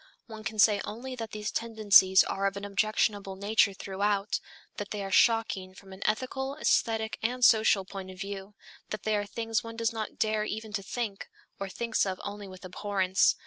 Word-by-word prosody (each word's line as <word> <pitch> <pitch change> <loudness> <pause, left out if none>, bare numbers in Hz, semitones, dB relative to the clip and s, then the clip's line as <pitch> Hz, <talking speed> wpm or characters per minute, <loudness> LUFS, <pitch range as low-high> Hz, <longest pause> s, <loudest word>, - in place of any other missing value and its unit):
One 220 -2 -10
can 215 - -4
say 205 -1 +5
only 250 +5 -6
that 225 -2 -5
these 215 -1 -4
tendencies 205 -4 +5
are 195 0 -1
of 195 0 -3
an 200 - -5
objectionable 205 -1 0
nature 200 +1 +3
throughout, 200 +1 -1 0.4
that 205 -1 -5
they 205 -1 -4
are 195 - -5
shocking 195 -4 +2
from 195 -1 -13
an 190 - -12
ethical, 265 +5 -1
aesthetic 225 -6 +1
and 245 +2 +2
social 215 -4 +5
point 190 -1 -7
of 185 0 -11
view, 200 +1 -6 0.3
that 215 - -5
they 215 -1 +1
are 205 0 -1
things 225 0 -2
one 230 0 -8
does 230 0 0
not 220 -1 -5
dare 215 -1 +1
even 215 0 -5
to 205 - -1
think, 205 0 -4 0.3
or 195 -1 -4
thinks 230 +3 0
of 185 -1 -3
only 205 0 -6
with 185 0 -11
abhorrence. 190 0 +2
210 Hz, 190 wpm, -29 LUFS, 195-220 Hz, 0.4 s, say